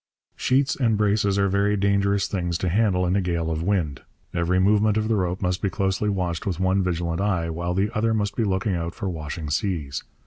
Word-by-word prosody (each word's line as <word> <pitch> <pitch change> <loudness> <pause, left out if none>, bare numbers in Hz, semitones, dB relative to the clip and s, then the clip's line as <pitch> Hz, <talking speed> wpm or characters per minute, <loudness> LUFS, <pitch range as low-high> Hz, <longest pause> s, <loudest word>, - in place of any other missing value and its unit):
Sheets 135 +2 +1
and 115 -5 +1
braces 100 -1 +2
are 100 0 +3
very 100 +2 +1
dangerous 100 0 +2
things 85 -3 -2
to 90 - -1
handle 95 -1 +2
in 90 +2 +1
a 100 - +2
gale 85 -2 -1
of 80 0 -2
wind. 85 -7 -1 0.3
Every 85 +2 +1
movement 105 +2 +3
of 110 0 0
the 115 - +3
rope 90 -1 -1
must 90 0 0
be 100 - +1
closely 95 +2 0
watched 90 -3 -2
with 90 -3 -2
one 95 +1 +2
vigilant 85 -1 -1
eye, 90 -5 0
while 85 +2 -2
the 105 +5 0
other 115 +1 +1
must 105 -2 -1
be 115 - +1
looking 95 0 0
out 85 -1 -3
for 100 - -4
washing 80 -2 -5
seas. 75 -4 -2
95 Hz, 215 wpm, -24 LUFS, 85-100 Hz, 0.3 s, are